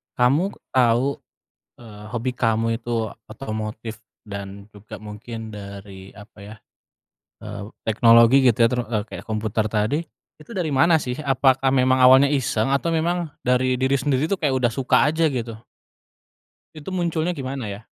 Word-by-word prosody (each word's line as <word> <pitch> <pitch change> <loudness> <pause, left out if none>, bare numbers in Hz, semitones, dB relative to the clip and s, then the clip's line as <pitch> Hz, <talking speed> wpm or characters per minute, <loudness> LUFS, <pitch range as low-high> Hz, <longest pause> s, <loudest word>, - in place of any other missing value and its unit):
Kamu 140 +11 +2 0.2
tau, 125 +2 +2 0.6
eee, 105 -3 -12
hobi 120 +1 -2
kamu 115 -1 +1
itu 115 -1 -2 0.2
otomotif 110 -1 -6 0.3
dan 100 0 -8
juga 105 +1 -11
mungkin 110 +1 -8
dari, 100 -1 -10
apa 105 +2 -16
ya, 105 +2 -10 0.9
eee, 105 -1 -7 0.2
teknologi 115 +4 +5
gitu 110 - 0
ya, - - +5
teru 125 -1 0
eee, 110 -3 -1
kayak - - -9
komputer 110 0 -1
tadi, 110 +8 0 0.4
itu 195 - -14
dari 170 -3 -1
mana 165 +5 +4
sih? 125 - -3
Apakah 135 -1 +2
memang 130 0 +3
awalnya 130 +2 +7
iseng, 125 -3 0
atau 140 +4 0
memang 170 0 -1 0.2
dari 125 0 +2
diri 130 +1 +1
sendiri 135 +1 0
tuh 200 - 0
kayak 135 -3 +1
udah 120 -2 +1
suka 135 +1 +2
aja 160 +1 +1
gitu? 120 -3 -4 1.2
Itu 155 +2 -9
munculnya 175 -2 -1
gimana 130 -4 -5
ya? 100 +3 -8
120 Hz, 150 wpm, -22 LUFS, 110-135 Hz, 1.2 s, awalnya